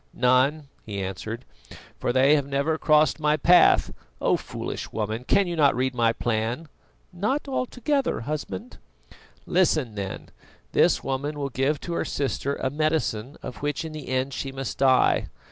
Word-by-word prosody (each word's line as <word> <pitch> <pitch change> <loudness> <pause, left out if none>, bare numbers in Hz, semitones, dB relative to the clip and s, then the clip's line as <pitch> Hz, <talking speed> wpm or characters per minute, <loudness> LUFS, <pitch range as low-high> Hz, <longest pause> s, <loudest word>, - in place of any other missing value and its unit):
"None," 130 +4 +2 0.2
he 100 -2 -5
answered, 105 +6 -5 0.5
"for - - 0
they 130 +3 +5
have 145 -2 +2
never 140 +3 0
crossed 155 +1 +3
my 150 0 +2
path. 175 +4 +5 0.3
Oh, - - +2
foolish - - -6
woman! 110 +3 -3
cannot 170 -7 +3
you - - -6
read 130 0 0
my 115 -2 +3
plan?" 115 +7 -2 0.4
"Not 215 +12 -1
altogether, 265 - -1
Husband." 140 -8 -5 0.7
"Listen 155 -9 +2
then: 100 -2 -6 0.4
this - - +3
woman 140 +3 -3
will 140 -1 -2
give 135 +3 0
to 170 - -5
her - - 0
sister 140 0 -2
a 130 - -2
medicine 150 -5 -1
of - - -7
which 145 +1 -2
in 160 - -6
the 155 -4 -8
end 130 +1 -1
she 135 - -4
must 135 0 -5
die. 130 -1 +4
140 Hz, 155 wpm, -25 LUFS, 125-155 Hz, 0.7 s, they